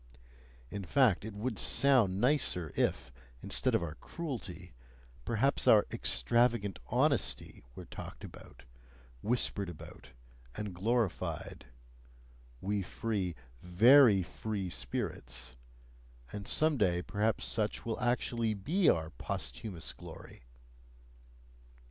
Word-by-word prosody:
In 100 - -5
fact, 120 -2 +3
it 105 -1 -7
would 110 0 -3
sound 120 -9 +4
nicer, 120 - +1
if, 65 +1 0 0.3
instead - - +1
of - - +1
our 80 -3 -4
cruelty, 95 - -7 0.5
perhaps 120 +5 +1
our 105 -2 +7
"extravagant 110 - +1
honesty" - - 0
were - - -9
talked - - -9
about, - - -12 0.6
whispered 105 -4 +1
about, 70 -5 -12 0.4
and 105 -3 -5
glorified 110 - -2 0.9
we 100 +1 -1
free, 95 -2 -3 0.3
VERY 105 +3 +6
free 100 0 -4
spirits 60 0 -4 0.8
and 100 -1 -6
some 155 -1 +3
day 90 -5 +1
perhaps 105 +4 -1
SUCH 110 -2 -1
will 115 -1 -3
actually 120 -2 0
be 165 - +2
our 80 0 +1
posthumous 80 - -4
glory! - - -12
105 Hz, 105 wpm, -32 LUFS, 90-120 Hz, 0.9 s, our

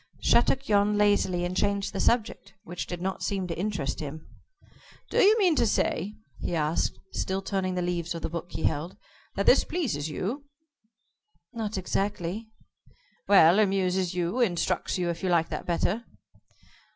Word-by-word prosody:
Shattuck 270 +1 +3
yawned 205 0 +3
lazily, 195 -4 +2
and 180 +1 -3
changed 200 0 0
the - - -3
subject, 220 -3 0
which 175 +1 -6
did 175 0 -5
not 190 0 -3
seem 195 -2 -1
to 170 -2 -4
interest 185 -6 -2
him. 155 +1 -7 0.9
"Do - - +2
you 425 +3 +6
mean 365 -7 +3
to 235 - +3
say," 205 0 0 0.2
he 175 - -2
asked, 155 0 0 0.2
still 190 +1 -2
turning 190 -2 -1
the 180 - -1
leaves 170 -1 -2
of 165 - -6
the - - 0
book 170 +1 -6
he - - -4
held, 165 +6 -1 0.4
"that - - -1
this - - +6
pleases 210 - -2
you?" 235 - -4 1.1
"Not 220 -3 -3
exactly." 200 +2 -2 0.8
"Well, 190 -1 +7
amuses 190 -3 +1
you? 180 +7 -1
Instructs 185 -6 0
you, 180 -1 -1
if 170 - -7
you 185 - -1
like 165 -2 +2
that - - -5
better?" 180 +6 0
185 Hz, 165 wpm, -27 LUFS, 175-210 Hz, 1.1 s, Well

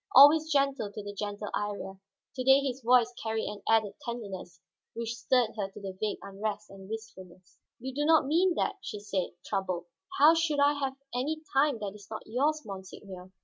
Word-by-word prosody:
Always 305 +4 +8
gentle 275 -7 +1
to 205 - -7
the 205 0 -6
gentle 205 0 -4
Iría, 200 -2 -3 0.4
to 255 - -2
day 265 +1 +7
his 270 -1 -3
voice 245 0 +4
carried 220 0 -1
an 205 -1 -6
added 220 -2 +3
tenderness 195 -7 -6 0.4
which 230 0 -3
stirred 245 0 +2
her 200 -2 -2
to 195 -1 -7
vague 215 -1 0
unrest 205 +1 -4
and 195 0 -12
wistfulness. 190 -5 -9 0.2
"You 260 +2 -5
do 290 +2 -1
not 315 -2 +5
mean 340 +5 +3
that," 400 - 0
she 210 - -6
said, 200 -3 -2
troubled. 185 -3 -2 0.3
"How 300 +3 +8
should 325 -3 +1
I 285 +1 +5
have 270 -2 -2 0.2
any 300 +6 -2
time 275 -1 +3
that 200 -2 -3
is 205 -2 -13
not 220 - -6
yours, 290 +7 0
monseigneur? 190 -1 -9
225 Hz, 185 wpm, -30 LUFS, 200-275 Hz, 0.4 s, Always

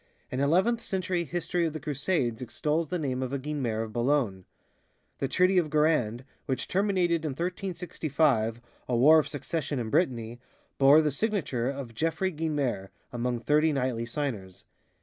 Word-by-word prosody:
An 130 - -2
eleventh 185 +12 +2
century 185 -2 -1
history 175 +1 -1
of 155 - -5
the 155 - -4
Crusades 140 -5 -1
extols 150 +5 -1
the 180 - -1
name 130 -5 -2
of 130 -1 -3
a - - +1
Guinemer 130 -6 -2
of 110 -1 -8
Boulogne. 120 -7 0 0.7
The 135 - 0
Treaty 180 +6 +3
of 160 -3 -1
Guérande, 150 -7 +1 0.2
which 130 -2 -2
terminated 180 -4 +1
in 150 -3 -2
1365 155 - -1 0.3
a 125 - +1
war 155 +6 +7
of 155 - -1
succession 150 0 -3
in 115 -3 -3
Brittany, 120 -8 0 0.4
bore 140 +3 +7
the 150 - +1
signature 140 - -1
of 135 -4 -6
Geoffroy 165 - -1
Guinemer 145 - -2 0.2
among 120 0 -2
thirty 150 +5 +3
knightly 125 -4 -1
signers. 115 -9 -4
145 Hz, 155 wpm, -28 LUFS, 125-165 Hz, 0.7 s, war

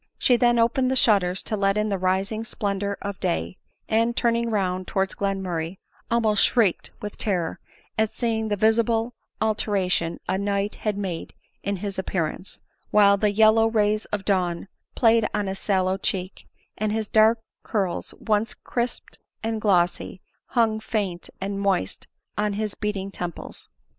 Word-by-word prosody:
She 250 - +4
then 240 0 +3
opened 235 +3 +3
the 260 - +1
shutters 190 -7 +3
to 215 - -2
let 195 0 +1
in 210 0 +1
the 200 - 0
rising 190 +4 0
splendor 200 -3 -2
of 200 -1 -4
day, 85 +2 -1 0.3
and, 230 +2 +1
turning 235 -1 +2
round 185 -4 -1
towards 195 -2 0
Glenmurray, 190 -3 -2 0.3
almost 220 -3 +3
shrieked 220 -8 +2
with 210 - -6
terror 180 -6 -1 0.4
at 220 0 +2
see 230 -2 -1
ing 220 - -2
the 210 - 0
visible 225 +2 +2 0.3
alteration 195 -6 0
a 190 +1 0
night 200 0 0
had 210 -2 -2
made 185 -5 -4 0.3
in 200 0 -1
his 195 0 -4
appear 185 -3 0
ance; 180 +5 -8 0.3
while 200 -1 +6
the 210 +1 +2
yellow 220 +2 +5
rays 215 -1 +1
of 210 - -3
the 200 - +2
dawn 180 -1 -1 0.3
played 225 -2 +4
on 210 -1 0
his 190 0 -3
sallow 190 -1 +1
cheek, 190 -1 -3 0.3
and 215 0 0
bis 220 -1 -1
dark 220 +2 +5 0.2
curls, 195 -5 -2
once 220 +1 0
crisped 240 0 -4 0.2
and 225 -1 -2
glossy, 180 -2 +1 0.3
hung 225 -3 +2
faint 205 -6 -3
and 200 +1 -3
moist 190 - -1 0.3
on 210 -1 +1
his 210 0 -2
beating 200 -2 -3
temples. 175 -3 -7
205 Hz, 160 wpm, -24 LUFS, 190-220 Hz, 0.4 s, while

